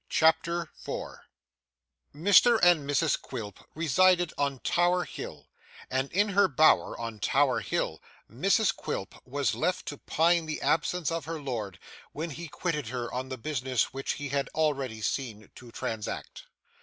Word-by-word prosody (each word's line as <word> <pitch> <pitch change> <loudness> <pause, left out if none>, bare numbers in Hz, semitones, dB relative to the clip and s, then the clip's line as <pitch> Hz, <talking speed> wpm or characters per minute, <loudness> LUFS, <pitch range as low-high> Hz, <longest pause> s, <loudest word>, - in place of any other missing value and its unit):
CHAPTER 165 +1 +2
4 - - -7 0.9
Mr 205 +8 +6
and 165 -5 +5
Mrs 145 +1 +2
Quilp 105 -6 -7 0.2
resided 175 +3 +3
on 140 -1 -1
Tower 175 +1 +2
Hill; - - -8 0.4
and 130 +1 -1
in 205 +3 +2
her 200 +1 +4
bower 155 +3 +3
on 115 -2 -5
Tower - - +2
Hill - - -2 0.3
Mrs - - +2
Quilp - - -4
was - - 0
left - - -1
to - - -7
pine 165 0 +2
the 155 - -3
absence 165 0 0
of 165 -4 -3
her 165 0 -4
lord, 115 -9 -4 0.4
when 160 +2 -4
he 170 +4 -7
quitted 150 -3 -3
her 120 0 -4
on 130 +1 -3
the 130 - -4
business 130 -2 -1
which 135 0 -2
he 145 -1 -5
had 140 0 -1
already 140 -8 0
seen 110 -5 -3
to 125 - -13
transact. 110 -1 -5
145 Hz, 150 wpm, -28 LUFS, 130-170 Hz, 0.9 s, Mr